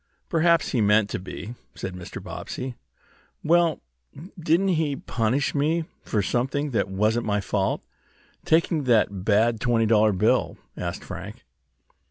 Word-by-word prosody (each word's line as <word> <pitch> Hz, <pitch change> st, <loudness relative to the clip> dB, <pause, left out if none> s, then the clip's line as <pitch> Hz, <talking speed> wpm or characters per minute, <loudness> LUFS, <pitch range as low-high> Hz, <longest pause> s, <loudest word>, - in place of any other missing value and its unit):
"Perhaps 170 Hz, -1 st, +3 dB
he 120 Hz, -, +1 dB
meant 105 Hz, 0 st, +3 dB
to -, -, -2 dB
be," 100 Hz, +4 st, -7 dB, 0.2 s
said 95 Hz, -, -5 dB
Mr. 90 Hz, -1 st, -8 dB
Bobbsey. 130 Hz, 0 st, -6 dB, 0.7 s
"Well, 170 Hz, 0 st, +3 dB, 0.6 s
didn't 170 Hz, +4 st, +2 dB
he 155 Hz, -5 st, +1 dB
punish 125 Hz, +2 st, -1 dB
me 155 Hz, +3 st, +1 dB, 0.2 s
for 105 Hz, -2 st, -1 dB
something 135 Hz, +7 st, -1 dB
that 100 Hz, -5 st, 0 dB
wasn't 110 Hz, +5 st, 0 dB
my 105 Hz, -1 st, +1 dB
fault 100 Hz, -1 st, -1 dB, 0.6 s
taking 160 Hz, -2 st, +2 dB
that 105 Hz, -6 st, +2 dB
bad 110 Hz, +3 st, +3 dB
twenty 115 Hz, -1 st, +2 dB
dollar 110 Hz, -1 st, +4 dB
bill?" 95 Hz, -, +1 dB, 0.2 s
asked 85 Hz, -1 st, -4 dB
Frank. -, -, -8 dB
120 Hz, 135 wpm, -25 LUFS, 105-155 Hz, 0.7 s, dollar